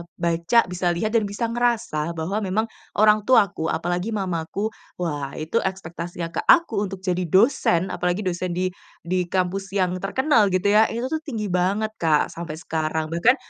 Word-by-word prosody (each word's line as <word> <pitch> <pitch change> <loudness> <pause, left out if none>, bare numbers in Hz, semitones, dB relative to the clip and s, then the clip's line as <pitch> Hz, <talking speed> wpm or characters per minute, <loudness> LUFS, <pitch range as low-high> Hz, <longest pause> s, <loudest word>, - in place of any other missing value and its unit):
baca, 170 +6 +2
bisa 180 -1 0
lihat, 215 +5 -1
dan 225 -2 +2
bisa 215 +3 -3
ngerasa 230 -10 0
bahwa 170 +6 -2
memang 210 +2 0 0.3
orang 210 0 +4
tuaku, 200 -9 +3
apalagi 175 +7 -2
mamaku, 190 +2 -2 0.3
wah 145 -5 -3
itu 155 +9 -1
ekspektasinya 175 -3 -4
ke - - -3
aku 225 -13 +4
untuk 190 0 -9
jadi 180 -1 0
dosen 190 - +3
apalagi 180 +3 -1
dosen 180 -1 -2
di 185 +1 0 0.3
di 180 +1 -1
kampus 190 +2 -2
yang 185 -2 +2
terkenal 230 +3 +2
gitu 190 +1 +1
ya, 215 +1 +6
itu 235 +2 -4
tuh 315 - 0
tinggi 215 - -3
banget, 195 +5 +1
Kak 155 -3 +2
sampai 165 -2 -6
sekarang. 160 -1 -2
Bahkan 195 +10 +4
185 Hz, 165 wpm, -23 LUFS, 170-215 Hz, 0.3 s, ya